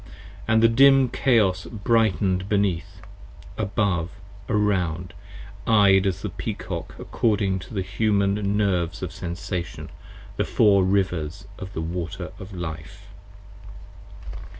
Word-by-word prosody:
And 110 0 +3
the - - +8
dim 135 +2 +5
Chaos 110 -10 +2
brighten'd 100 -4 +1
beneath, 100 -2 -1 0.5
above, 95 -5 -1 0.4
around! 90 -5 0 0.5
Eyed 100 -3 +5
as 95 -1 -2
the - - -2
Peacock - - -5
15 - - -9
According 100 -4 0
to 90 +5 -10
the 95 - -1
Human 100 0 0
Nerves 95 -2 0
of 90 - -4
Sensation, 90 0 -5 0.5
the - - +2
Four 100 -3 +4
Rivers 95 -1 -1
of 95 +1 -8
the 80 - -3
Water 85 0 -5
of 95 +2 -9
Life. 80 -4 -7
95 Hz, 115 wpm, -24 LUFS, 90-105 Hz, 0.5 s, the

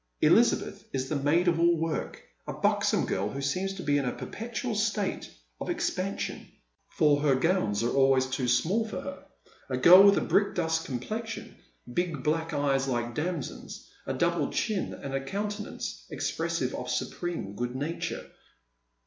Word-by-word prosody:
Elizabeth - - +3
is 130 -1 -2
the 155 - -1
maid 150 +6 +2
of 170 -1 +3
all 170 0 +4
work, 160 0 -3 0.2
a - - -3
buxom - - +1
girl 100 +2 -1
who 135 - -5
seems 185 +8 -1
to 185 - -6
be 145 -1 +2
in 140 - -2
a 125 - 0
perpetual 230 +1 -5
state 210 -2 -1 0.3
of - - -5
expansion, - - -2 0.4
for 145 -2 +3
her 145 -3 +4
gowns 130 - +1
are 120 - 0
always 135 -1 +4
too 130 -1 -2
small 165 - +2
for 220 - -5
her, 185 0 -7 0.5
a 130 - -1
girl 175 +9 +9
with 200 0 +7
a - - +2
brickdust 165 -5 +1
complexion, 215 - -5 0.4
big 170 -5 -1
black 160 +2 0
eyes 135 -2 +1
like 120 -2 -1
damsons, 170 +7 -5 0.2
a - - -1
double - - +1
chin, 215 -4 -1
and 140 -1 -7
a 135 0 -1
countenance 205 +5 -5
expressive - - -2
of - - -5
supreme 170 - -3
good 120 +3 -3
nature. 150 +5 -3
160 Hz, 160 wpm, -28 LUFS, 135-185 Hz, 0.5 s, girl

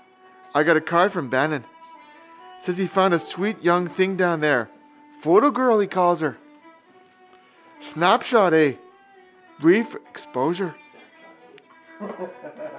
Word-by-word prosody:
I - - +3
got 165 0 +4
a - - -1
card 175 +5 +2
from 170 -9 -6
Bannon. 145 +4 -1 1.0
Says 180 - -6
he 190 -1 -2
found 190 0 +2
a 170 - +2
sweet 200 +7 -5
young 175 +1 +2
thing 190 +1 -2
down 175 -4 0
there. 150 -1 +1 0.5
Photo 320 -2 +4
girl 245 -4 +2
he 200 - 0
calls 175 -2 +1
her. 155 - -4 1.4
—Snapshot, 225 - +2
eh? 155 -2 +4 0.9
Brief 325 -9 +3
exposure. 195 - -6
180 Hz, 115 wpm, -21 LUFS, 170-210 Hz, 1.4 s, got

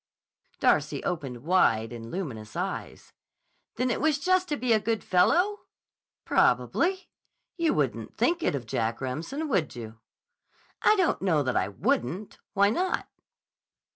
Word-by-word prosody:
Darcy - - +2
opened 135 -8 -4
wide 120 -10 +2
and 115 -1 -8
luminous 120 - -6
eyes. 185 +3 -5 0.6
"Then 250 0 0
it - - -2
was 310 -1 +3
just 370 +4 +2
to 295 - -1
be 250 -3 +2
a 220 - +4
good 220 0 -1
fellow?" 355 - +3 0.7
"Probably. 375 +1 +2 0.4
You 335 -3 +1
wouldn't - - -2
think 340 0 +2
it - - +1
of 130 -4 -4
Jack 115 +1 -1
Remsen, 165 - -4
would 190 - 0
you?" 115 -1 -8 0.8
"I 430 - +5
don't 370 -5 +1
know 165 -6 +2
that 130 -2 -1
I - - +2
wouldn't. 210 - -2
Why 200 +1 +4
not?" 365 +9 -1
195 Hz, 140 wpm, -27 LUFS, -, 0.8 s, I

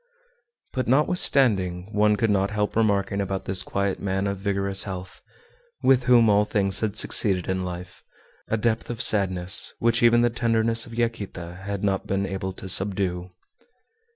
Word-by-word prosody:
But, 130 - -2
notwithstanding 115 - +2
one 105 0 +3
could 110 0 0
not 100 0 +1
help 105 -1 -2
remarking 100 -2 0
about 95 0 -4
this 95 0 0
quiet 100 0 -2
man 95 0 -2
of 100 -1 -3
vigorous 100 -1 0
health, 95 -2 -7 0.6
with 130 -2 +3
whom 120 -2 +5
all 105 0 +4
things 100 -2 0
had 110 -1 -3
succeeded 95 -5 +2
in 95 0 -2
life, 90 0 -8 0.4
a 110 - -1
depth 110 +1 -1
of 120 -2 -5
sadness 95 -4 +3
which 115 +1 +1
even 120 0 +4
the 120 - +2
tenderness 115 -1 0
of 115 - -10
Yaquita 100 -7 -4
had 100 -1 -5
not 95 -2 -1
been 100 0 -1
able 95 0 -4
to 95 - -8
subdue. 95 -2 0
100 Hz, 160 wpm, -24 LUFS, 95-115 Hz, 0.6 s, whom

